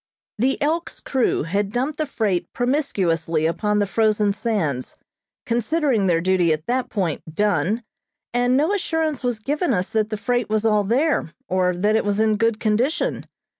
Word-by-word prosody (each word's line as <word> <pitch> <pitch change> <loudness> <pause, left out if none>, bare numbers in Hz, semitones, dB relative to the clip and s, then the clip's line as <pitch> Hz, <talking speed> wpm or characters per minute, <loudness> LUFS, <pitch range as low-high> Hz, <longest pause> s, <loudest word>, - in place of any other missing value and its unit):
The 260 +4 +1
"Elk's" 330 +3 -1
crew 260 - 0
had 200 +5 -1
dumped 265 +6 -2
the 310 - 0
freight 200 -9 -1
promiscuously 180 - 0
upon 210 +6 0
the 205 - +2
frozen 210 0 +2
sands, 170 - -2 0.5
considering 240 -2 +1
their 165 -2 +2
duty 180 -2 +2
at 155 +1 -5
that 250 +1 -1
point 185 -8 -1
done, 205 +2 +1 0.5
and 245 +1 +2
no 315 +8 +2
assurance 320 -7 -1
was 245 -2 0
given 285 +4 0
us 180 +1 -2
that 215 -1 +1
the 215 - -3
freight 245 0 -1
was 215 0 +1
all 210 -2 +3
there, 250 - +1 0.2
or 180 -1 +1
that 205 +4 +1
it 220 - +2
was 205 0 0
in 220 -1 +3
good 225 0 +1
condition. 235 +8 0
215 Hz, 170 wpm, -22 LUFS, 190-250 Hz, 0.5 s, all